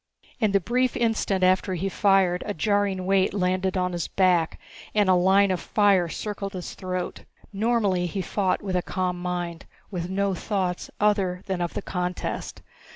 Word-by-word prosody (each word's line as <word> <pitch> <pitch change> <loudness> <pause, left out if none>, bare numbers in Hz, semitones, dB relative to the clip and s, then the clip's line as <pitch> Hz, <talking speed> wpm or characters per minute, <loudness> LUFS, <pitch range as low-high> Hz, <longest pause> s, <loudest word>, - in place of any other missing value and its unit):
In 215 -4 +2
the 200 - +4
brief 250 +6 0
instant 220 -5 +1
after 185 +1 +3
he 185 +3 -2
fired, 195 -2 +3
a 205 - -2
jarring 200 +1 0
weight 195 0 +2
landed 185 0 0
on 180 0 0
his 170 -2 -2
back 180 -4 +2 0.4
and 205 -2 +4
a 185 - +5
line 190 +2 +4
of 185 - 0
fire 200 -4 +3
circled 200 +1 -5
his 180 -2 -6
throat. 185 -1 -4 0.3
Normally 200 -4 +1
he 190 +2 -3
fought 195 0 0
with 190 -2 -2
a 180 - +2
calm 180 0 -2
mind, 175 -2 -4 0.2
with 175 -2 -4
no 195 +1 0
thoughts 185 -1 -2
other 195 -3 +1
than 190 -2 -2
of 175 - -3
the - - -3
contest. 180 -1 -4
190 Hz, 170 wpm, -25 LUFS, 180-200 Hz, 0.4 s, a